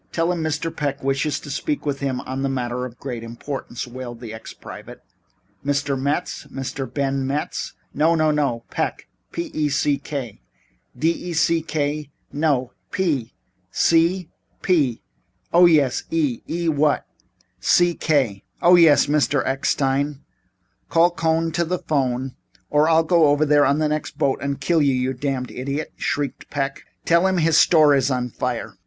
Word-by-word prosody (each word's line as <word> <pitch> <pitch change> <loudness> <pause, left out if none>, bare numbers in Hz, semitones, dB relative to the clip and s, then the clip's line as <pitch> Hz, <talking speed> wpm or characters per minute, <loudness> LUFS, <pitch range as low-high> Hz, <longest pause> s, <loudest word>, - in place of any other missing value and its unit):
"Tell 165 +1 +1
him 175 -2 -2
Mr. 160 +1 -2
Peck 140 -2 -3
wishes 135 +2 0
to 145 - -8
speak 295 - -2
to 145 - 0
him 135 -2 -3
on 130 +1 -4
a 135 - 0
matter 125 -1 -2
of 125 - -8
very 125 - -34
great 125 -4 -5
importance," 120 +1 -6
wailed 120 -1 -8
the 115 -3 -8
ex 110 - -9
private. - - -11 0.6
"Mr. 145 0 0
Metz? 140 +6 -2
Mr. 135 -1 -5
Ben 135 -1 -1
Metz? 145 +2 -3 0.2
"No, 160 +3 +3
no, 155 -1 +3
no. 140 -6 0
Peck - - -2 0.3
p 170 - -4
e 150 -1 0
c 140 0 +1
k." 130 -8 -6 0.6
"D 160 +6 +2 0.2
e - - -3
c 165 +1 +2
k?" 150 -2 -2 0.2
"No, 140 -4 +1 0.2
P." 150 -11 -1 0.3
"C?" 170 +1 +2 0.3
"P." 145 -11 +1 0.5
"Oh, 175 +1 +8
yes, 145 -6 +2
E. 150 -7 0
E 170 +1 -2
what?" 150 -1 +2 0.5
"C 175 -1 +4
K 130 - 0
" - - -42
"Oh, 175 - +7
yes, 165 -4 +6
Mr. 145 -1 +1
Eckstein." 135 +1 0 0.7
"Call 170 +1 +4
Cohn 165 -1 0
to 170 - 0
the 180 +2 -1
'phone 130 -4 -1 0.4
or 150 +2 +4
I'll 165 0 +5
go 165 -1 +4
over 145 +1 +3
there 145 -1 +4
on 140 +1 +2
the 155 0 +1
next 150 0 -3
boat 135 -1 +1
and 140 -1 -2
kill 170 -2 +2
you, 140 -2 +3
you 130 +1 0
damned 130 -1 -3
idiot," 140 +4 -4
shrieked 140 -1 -3
Peck. 140 -1 -3 0.2
"Tell 170 +3 +4
him 190 -1 +1
his 165 -2 +4
store 155 -4 +6
is 135 -1 +2
on 125 -2 -1
fire." 115 -5 -4
145 Hz, 170 wpm, -22 LUFS, 130-160 Hz, 0.7 s, Oh